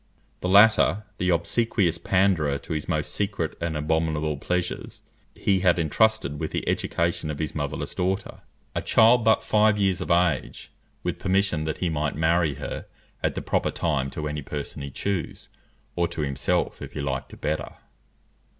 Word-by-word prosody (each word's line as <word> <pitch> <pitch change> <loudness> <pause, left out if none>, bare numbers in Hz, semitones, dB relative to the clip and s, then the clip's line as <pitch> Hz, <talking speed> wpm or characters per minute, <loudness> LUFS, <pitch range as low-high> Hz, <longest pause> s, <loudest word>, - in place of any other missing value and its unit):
The 90 - -2
latter, 105 +1 +6 0.2
the 90 - +1
obsequious 85 0 +1
panderer 85 -6 +2
to 80 - -6
his 75 -1 -4
most - - -1
secret 100 -6 -2
and 85 -2 -1
abominable 80 -1 0
pleasures, 90 +5 -3 0.3
he 95 -2 +1
had 90 -1 +3
entrusted 85 -2 +1
with - - -2
the - - -3
education 85 -2 0
of 75 - -3
his 75 +1 -3
motherless 75 -1 -3
daughter, 95 +2 -2 0.3
a - - -1
child 115 +1 +5
but 110 0 +4
five 105 -1 +3
years 95 -3 +1
of - - -4
age, 85 -1 +1 0.3
with - - -2
permission 95 -4 +1
that 80 0 -2
he 90 - -1
might 75 -1 -1
marry 80 -1 +2
her - - -6 0.3
at - - 0
the - - -4
proper - - 0
time 70 -5 -1
to 75 +2 -4
any 75 0 -3
person 70 0 -6
he 70 - -5
chose, 95 +6 -4 0.5
or 85 -1 +1
to 80 -2 -5
himself 70 -1 -1
if - - -8
he - - -5
liked 70 -2 -3
it - - -12
better. 75 +1 -2
85 Hz, 170 wpm, -25 LUFS, 75-95 Hz, 0.5 s, latter